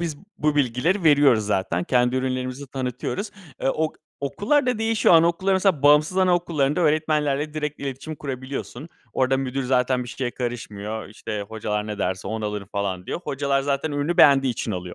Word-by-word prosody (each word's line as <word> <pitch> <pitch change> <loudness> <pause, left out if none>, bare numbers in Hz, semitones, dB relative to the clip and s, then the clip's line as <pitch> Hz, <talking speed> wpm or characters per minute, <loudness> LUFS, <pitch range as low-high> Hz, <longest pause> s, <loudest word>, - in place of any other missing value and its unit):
biz 165 -4 -3 0.2
bu 150 0 +1
bilgileri 145 - +1
veriyoruz 140 -7 +5
zaten. 95 -4 0
Kendi 125 0 +2
ürünlerimizi 130 +1 -3
tanıtıyoruz. 130 - -4 0.3
Eee, - - +2
ok 155 +2 0 0.3
okullarda 245 - +1
değişiyor 225 -5 +3
anaokulların 170 +4 +3
mesela 185 -7 +1
bağımsız 150 +4 +5
anaokullarında 175 -4 +2
öğretmenlerle 150 -2 +1
direkt 150 -1 -3
iletişim 140 +3 -5
kurabiliyorsun. 135 +1 -6 0.2
Orada 130 0 +2
müdür 135 0 -2
zaten 125 0 +1
bir 120 - -9
şeye 125 0 -3
karışmıyor, 110 -4 -5
işte, 105 -1 -5
hocalar 105 -1 -3
ne 105 -1 -5
derse 95 -1 -2
onu 110 0 -3
alırım 105 -2 -4
falan 95 -3 -3
diyor. - - -4
Hocalar 140 0 0
zaten 140 +2 -1
ürünü 145 +4 -1
beğendiği 135 -6 +6
için 115 -1 -4
alıyor. 90 -1 -5
135 Hz, 160 wpm, -23 LUFS, 120-155 Hz, 0.3 s, beğendiği